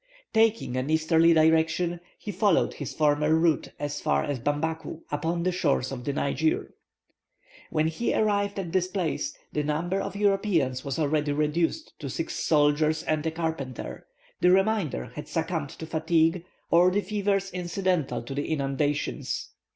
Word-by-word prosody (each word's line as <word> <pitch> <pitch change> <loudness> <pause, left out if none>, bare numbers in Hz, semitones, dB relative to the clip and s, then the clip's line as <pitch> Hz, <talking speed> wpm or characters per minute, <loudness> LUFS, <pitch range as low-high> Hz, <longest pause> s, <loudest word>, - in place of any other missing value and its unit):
Taking 225 - +2
an 130 +3 -2
easterly 160 +1 +4
direction, 160 +2 +3 0.2
he 210 - -6
followed 195 -1 +2
his - - -6
former 150 0 +2
route 160 -2 +2
as 145 0 -3
far 70 0 +1
as 145 -3 -2
Bambaku, 160 +4 -2
upon 165 +3 -1
the 185 - +2
shores 145 -7 0
of 125 -2 -5
the 140 - 0
Niger. 315 - 0 1.0
When 155 0 +1
he 160 +9 -1
arrived 200 -1 +1
at 180 -4 -3
this 185 0 +1
place, 185 -5 -2 0.2
the 150 - +1
number 165 +6 -1
of - - -5
Europeans 195 - +1
was 140 -3 -3
already 150 -1 +1
reduced 160 - 0
to 140 - -5
six 165 +5 -3
soldiers 155 +1 +2
and 155 -1 0
a - - +3
carpenter; 160 -6 -4 0.3
the 180 - +4
remainder 190 - +1
had - - -7
succumbed 70 - -2
to 160 - -8
fatigue, 165 +2 +1 0.3
or 175 +2 +6
the 200 +3 +1
fevers 200 -1 -1
incidental 175 -8 -1
to 125 - -6
the 145 +1 -2
inundations. 145 0 -1
160 Hz, 155 wpm, -27 LUFS, 145-185 Hz, 1.0 s, or